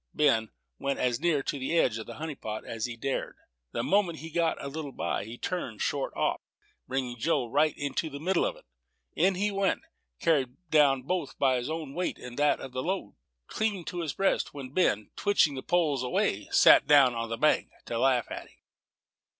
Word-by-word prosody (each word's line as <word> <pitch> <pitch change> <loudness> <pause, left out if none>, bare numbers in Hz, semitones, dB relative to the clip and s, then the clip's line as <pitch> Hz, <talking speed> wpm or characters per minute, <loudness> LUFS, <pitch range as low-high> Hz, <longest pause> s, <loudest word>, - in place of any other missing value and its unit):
Ben 115 -7 +3 0.3
went 140 0 -1
as 125 -1 0
near 155 -5 +1
to 140 - -3
the 135 +6 0
edge 115 -8 +2
of 110 - -8
the - - -8
honey 155 0 -4
pot 110 -5 -6
as 115 +1 -3
he 120 -1 -7
dared. 135 +3 -3 0.3
The - - -2
moment 190 -4 +2
he 160 +2 -8
got 165 0 +1
a - - -5
little 145 0 -5
by, 100 - -2
he 115 +3 -8
turned 130 - -3
short - - -1
off, - - 0 0.5
bringing 125 -2 -3
Joe 145 -2 +1
right 150 +6 +1
into 145 +3 -2
the 140 -1 -7
middle 180 +3 +1
of - - -1
it. - - -18 0.5
In 185 +3 +3
he 205 +3 0
went, 195 -1 0 0.4
carried 135 -6 +1
down 140 -4 +4
both 175 0 -2
by 130 -2 +3
his 125 +3 -3
own 155 -3 -4
weight 180 +3 -2
and 125 -1 -9
that 145 0 +3
of 135 - -8
the 130 - -3
load, 180 - -3 0.3
clean 205 - -2
to 175 +2 -4
his 155 -4 -3
breast, 195 -5 0
when 135 -3 -7
Ben, 110 - +1
twitching 200 -7 +3
the 130 - -5
poles 155 -5 +1
away, 125 -1 0
sat - - +7
down 140 -4 +6
on 115 0 -3
the 115 - -3
bank 150 +5 +2 0.2
to 115 - -3
laugh 125 -2 +3
at - - -6
him. - - -24
140 Hz, 205 wpm, -29 LUFS, 125-165 Hz, 0.5 s, sat